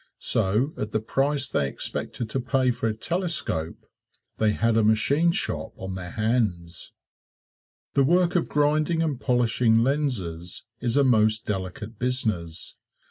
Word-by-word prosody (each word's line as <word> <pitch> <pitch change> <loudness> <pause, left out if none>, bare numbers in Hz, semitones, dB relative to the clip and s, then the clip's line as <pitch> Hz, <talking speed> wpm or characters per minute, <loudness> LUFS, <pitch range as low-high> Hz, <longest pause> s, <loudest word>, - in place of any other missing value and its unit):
So 110 +10 +2
at 105 0 -5
the 110 - +1
price 135 +5 +1
they 70 - -1
expected 110 - -1
to 135 - -1
pay 130 0 0
for 115 - -2
a - - -2
telescope 165 - 0 0.5
they 110 -1 +2
had 115 +1 0
a 110 - +3
machine 140 +10 +3
shop - - -1
on 95 0 -6
their 90 -2 -7
hands. 105 -6 -2 1.0
The 140 - +3
work 175 +5 +2
of 175 - 0
grinding 155 +3 +1
and 145 -5 -3
polishing 120 -2 +2
lenses 105 - -2
is 120 +1 +2
a 140 - +4
most 110 -3 +3
delicate 100 +3 -6
business. 110 -10 -1
115 Hz, 140 wpm, -24 LUFS, 105-140 Hz, 1.0 s, a